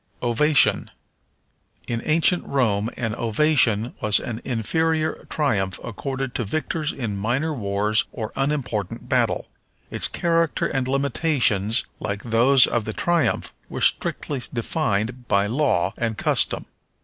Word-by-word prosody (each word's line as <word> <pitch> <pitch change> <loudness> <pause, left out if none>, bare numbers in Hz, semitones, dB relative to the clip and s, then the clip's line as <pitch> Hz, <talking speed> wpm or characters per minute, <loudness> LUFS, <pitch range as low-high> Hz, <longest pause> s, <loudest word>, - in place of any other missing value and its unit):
Ovation. 145 +5 +3 1.0
In 115 -1 -2
ancient 165 +3 +3
Rome 110 -6 +1
an 115 -3 -2
ovation 115 -1 +2
was 105 -3 +4
an 115 -1 -5
inferior 155 +7 -1
triumph 100 - 0
accorded 135 +2 -4
to 120 - -1
victors 155 +6 -2
in 115 -6 -4
minor 125 +10 -1
wars 105 -2 0
or 110 -3 -6
unimportant 135 -8 -2
battle. - - +1 0.4
Its - - -1
character 165 -2 0
and 130 -1 -1
limitations, 130 - +1
like 100 -1 -4
those 120 +3 +5
of 120 -3 -1
the 110 - -4
triumph, 170 +4 0 0.2
were - - -5
strictly 140 -4 0
defined 120 -2 -2
by 100 0 +2
law 105 - +1
and 115 -2 -2
custom. - - +1
120 Hz, 125 wpm, -23 LUFS, 110-150 Hz, 1.0 s, those